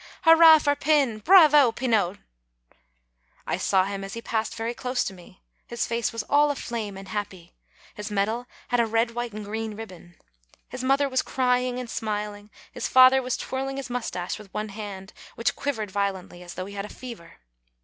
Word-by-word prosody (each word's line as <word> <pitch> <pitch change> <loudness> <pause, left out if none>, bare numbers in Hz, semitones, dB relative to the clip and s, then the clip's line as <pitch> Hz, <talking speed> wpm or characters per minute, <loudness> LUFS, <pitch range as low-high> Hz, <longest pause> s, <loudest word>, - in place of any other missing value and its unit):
hurrah 325 -1 +8
for 290 -1 +1
Pin! 280 -7 +1
bravo, 300 - +7
Pinot!" 220 -6 0 1.3
I - - -1
saw 190 -1 +2
him 195 0 -5
as 195 +2 -7
he - - -4
passed 220 0 -2
very 230 +1 -3
close 250 +1 -2
to 195 - -5
me. 185 0 -17 0.2
His 235 0 -2
face 235 0 -1
was 230 -2 -4
all 290 +4 +3
aflame 230 -7 -4
and 195 0 -10
happy; 190 -5 -6 0.4
his 210 0 -7
medal 215 +4 -1 0.2
had 245 - +1
a 230 - +3
red, 230 +1 +1
white, 240 0 -4
and 210 0 -7
green 220 +1 -4
ribbon. 185 -5 -11 0.5
His 255 0 -6
mother 275 +2 +2
was 260 -1 +1
cry 250 -1 +1
ing 250 0 -3
and 250 -1 -5
smiling; 210 -2 -4 0.2
his - - -4
father 260 +1 +7
was 250 -1 -2
twirling 270 +1 -4
his 270 -3 -6
moustache 220 -7 -4
with 205 -3 -14
one 210 0 -3
hand, 200 -2 -8 0.2
which 230 - -1
quivered 220 -8 -3
violently, 190 -3 -3
as 175 -1 -10
though 185 - -5
he 200 - -10
had 200 0 -4
a - - -10
fever. 235 -9 -10
225 Hz, 190 wpm, -25 LUFS, 200-255 Hz, 1.3 s, hurrah